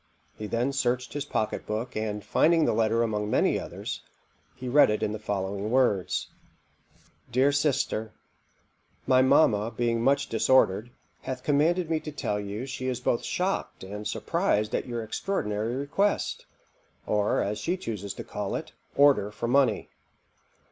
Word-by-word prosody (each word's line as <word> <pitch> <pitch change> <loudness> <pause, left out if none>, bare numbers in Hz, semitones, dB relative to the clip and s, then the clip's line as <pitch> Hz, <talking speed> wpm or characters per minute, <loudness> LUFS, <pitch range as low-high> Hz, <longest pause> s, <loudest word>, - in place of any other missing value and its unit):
He 105 - -6
then 120 +5 0
searched 125 -2 -1
his 145 0 -3
pocket 110 0 -2
book, 110 +4 -3
and 105 -1 -3
finding 165 -1 +3
the - - +2
letter 115 +1 +2
among 105 -2 -1
many - - +2
others, - - -6 0.5
he 130 - -7
read 140 +1 +6
it 105 - 0
in - - 0
the 110 - -4
following 100 0 -3
words: 120 -7 +1 1.0
"'DEAR 130 +4 +4
SISTER, 140 -6 0 0.9
My 130 -1 +5
mamma 115 -5 +4
being 115 0 0
much 140 +3 +2
disordered, 115 -2 +3 0.3
hath 130 -1 -5
commanded 160 +4 +2
me 160 - +2
to 155 - -7
tell 105 -8 -2
you 105 +4 -5
she 130 -1 -5
is 130 -1 -1
both 120 -1 0
shocked 185 - -2
and 105 +2 -6
surprized 105 +1 0
at - - -1
your 120 -2 -3
extraordinary 110 - -2
request, 150 +10 -1 0.6
or, 105 -1 +1
as 105 +1 -2
she 175 - -1
chuses 100 - -5
to - - -6
call 105 -1 -4
it, - - -5 0.2
order 140 -8 +5
for 105 +3 -4
money. 125 -4 +2
115 Hz, 155 wpm, -27 LUFS, 105-140 Hz, 1.0 s, read